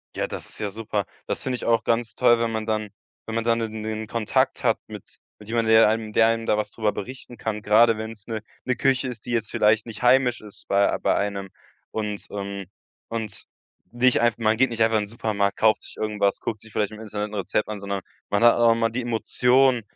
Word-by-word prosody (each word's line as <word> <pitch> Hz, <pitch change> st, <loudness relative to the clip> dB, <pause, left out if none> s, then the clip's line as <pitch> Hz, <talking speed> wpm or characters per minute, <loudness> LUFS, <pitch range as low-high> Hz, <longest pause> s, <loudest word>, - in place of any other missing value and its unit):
Ja, -, -, -1 dB
das -, -, -7 dB
ist -, -, -10 dB
ja 105 Hz, -, -2 dB
super. 105 Hz, -1 st, -3 dB, 0.2 s
Das -, -, -3 dB
finde 130 Hz, -, -2 dB
ich -, -, -6 dB
auch 115 Hz, -1 st, +2 dB
ganz 115 Hz, 0 st, 0 dB
toll, 120 Hz, -2 st, +4 dB
wenn 115 Hz, -1 st, 0 dB
man 110 Hz, 0 st, -3 dB
dann 110 Hz, -1 st, -1 dB, 0.4 s
wenn 110 Hz, -, -6 dB
man 115 Hz, -, 0 dB
dann 115 Hz, 0 st, +1 dB
in 110 Hz, -1 st, -4 dB
den 110 Hz, 0 st, -3 dB
Kontakt 110 Hz, 0 st, 0 dB
hat -, -, +3 dB
mit -, -, -9 dB, 0.4 s
mit 105 Hz, -, -14 dB
jemand, 115 Hz, -1 st, +1 dB
der 110 Hz, -1 st, +7 dB
einem 110 Hz, -1 st, -2 dB
der 110 Hz, +1 st, +5 dB
einem 115 Hz, 0 st, 0 dB
da 105 Hz, -, +2 dB
was 105 Hz, -, -2 dB
drüber 110 Hz, -2 st, -1 dB
berichten 125 Hz, +3 st, -7 dB
kann. 105 Hz, -1 st, -4 dB
Gerade 110 Hz, +2 st, +5 dB
wenn's 110 Hz, -2 st, -7 dB
'ne 110 Hz, -2 st, -3 dB, 0.2 s
'ne 125 Hz, -, +1 dB
Küche 130 Hz, +1 st, +1 dB
ist, 120 Hz, -4 st, -7 dB
die 120 Hz, -, -5 dB
jetzt 115 Hz, -2 st, -1 dB
vielleicht 110 Hz, +2 st, +2 dB
nicht 110 Hz, +1 st, -8 dB
heimisch 125 Hz, -1 st, +4 dB
ist 105 Hz, -2 st, -13 dB
bei 100 Hz, 0 st, +3 dB
ei -, -, 0 dB
bei -, -, +2 dB
einem. 100 Hz, -1 st, -2 dB, 0.4 s
Und, 105 Hz, -2 st, -4 dB
ähm 100 Hz, -1 st, -5 dB, 0.4 s
und 115 Hz, -2 st, -5 dB, 0.5 s
nicht 120 Hz, 0 st, +3 dB
einfach 120 Hz, -2 st, +2 dB
man 110 Hz, -1 st, +2 dB
geht 130 Hz, +2 st, +4 dB
nicht 115 Hz, -1 st, +1 dB
einfach 110 Hz, -1 st, +3 dB
in 105 Hz, -, 0 dB
den -, -, -15 dB
Supermarkt, 100 Hz, -2 st, -1 dB
kauft 110 Hz, -1 st, +3 dB
sich -, -, -10 dB
irgendwas, 105 Hz, -2 st, 0 dB
guckt 110 Hz, -2 st, -4 dB
sich 110 Hz, -, -14 dB
vielleicht 105 Hz, -1 st, 0 dB
im 110 Hz, -, -10 dB
Internet 105 Hz, -1 st, -4 dB
'n -, -, -12 dB
Rezept 100 Hz, +2 st, -1 dB
an, 105 Hz, -1 st, -5 dB
sondern 100 Hz, -1 st, -3 dB, 0.3 s
man 100 Hz, +2 st, +1 dB
hat 120 Hz, -, +8 dB
auch 115 Hz, -1 st, +4 dB
immer 115 Hz, 0 st, 0 dB
die 125 Hz, +2 st, -2 dB
Emotion 125 Hz, +2 st, +2 dB
110 Hz, 240 wpm, -24 LUFS, 105-115 Hz, 0.5 s, hat